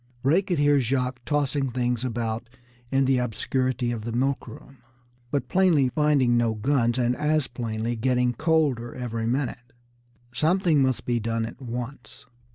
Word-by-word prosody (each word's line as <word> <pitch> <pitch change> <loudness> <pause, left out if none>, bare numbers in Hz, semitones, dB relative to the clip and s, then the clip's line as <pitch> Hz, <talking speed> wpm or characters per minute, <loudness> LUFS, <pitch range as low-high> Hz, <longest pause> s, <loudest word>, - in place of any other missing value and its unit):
Ray 155 +8 +4
could 185 -3 -2
hear 145 0 +4
Jacques 125 0 -1
tossing 145 -2 0
things 125 -1 -1
about 115 -1 -3 0.4
in 135 0 +3
the 130 -1 +3
obscurity 125 +1 -1
of 115 -3 -4
the 115 - -4
milk 130 +4 -1
room, 135 -1 -12 0.5
but 140 +2 -1
plainly 175 -8 +3
finding 140 -4 +2
no 115 -2 +2
guns, 120 +1 +1
and 125 0 +1
as 150 0 +1
plainly 115 -1 -3
getting 125 +1 +1
colder 145 -5 0
every 115 -3 -3
minute. 120 -1 -3 0.6
Something 160 +3 +2
must 130 -2 +1
be 120 -1 0
done 115 0 -1
at 115 - -9
once. 120 -1 -7
125 Hz, 155 wpm, -25 LUFS, 120-140 Hz, 0.6 s, Ray